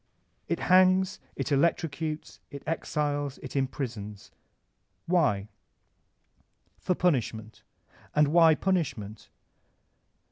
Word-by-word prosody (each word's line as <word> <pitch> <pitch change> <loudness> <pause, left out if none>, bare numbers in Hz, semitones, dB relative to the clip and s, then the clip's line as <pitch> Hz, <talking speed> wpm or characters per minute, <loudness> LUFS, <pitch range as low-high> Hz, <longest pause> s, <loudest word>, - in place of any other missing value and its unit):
It - - -2
hangs, 185 +1 +4 0.2
it - - -3
electrocutes, 155 +1 -1
it 140 - -9
exiles, 145 -3 -2
it - - -8
im 135 -1 +2
prisons. 110 -7 -7 0.7
Why? 140 - +1 1.3
For 180 - 0
punishment. 115 -10 -1 0.5
And 150 -1 +4
why 165 0 +6
punish 180 -6 0
ment? 105 +1 -10
150 Hz, 95 wpm, -28 LUFS, 125-170 Hz, 1.3 s, why